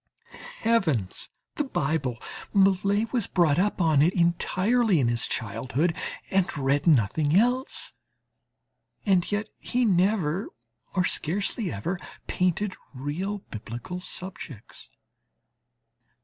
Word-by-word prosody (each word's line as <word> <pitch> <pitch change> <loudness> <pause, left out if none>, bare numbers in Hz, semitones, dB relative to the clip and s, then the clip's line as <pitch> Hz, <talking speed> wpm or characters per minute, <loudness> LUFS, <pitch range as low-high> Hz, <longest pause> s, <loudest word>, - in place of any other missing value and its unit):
Heavens! 160 - +1 0.3
the 295 - +2
Bible! 140 - -1 0.4
Millet 200 +3 +3
was 235 -5 +1
brought 170 -4 +3
up 205 +2 +1
on 160 -5 +4
it 170 +5 +3
entirely 185 +4 +3
in 120 -4 +2
his 120 0 +1
childhood, 130 - -1 0.4
and 190 -4 +1
read 140 +3 +1
nothing 145 - +3
else; 245 +6 +2 1.1
and 190 -3 +2
yet 205 +1 -1
he 250 0 0
never, 190 -2 +2 0.5
or 180 -1 +3
scarcely 195 +4 -1
ever 170 - -3 0.3
painted 185 +2 0 0.2
real 180 +10 -3
Biblical 120 +10 -6
subjects. 180 - -6
180 Hz, 105 wpm, -26 LUFS, 145-200 Hz, 1.1 s, on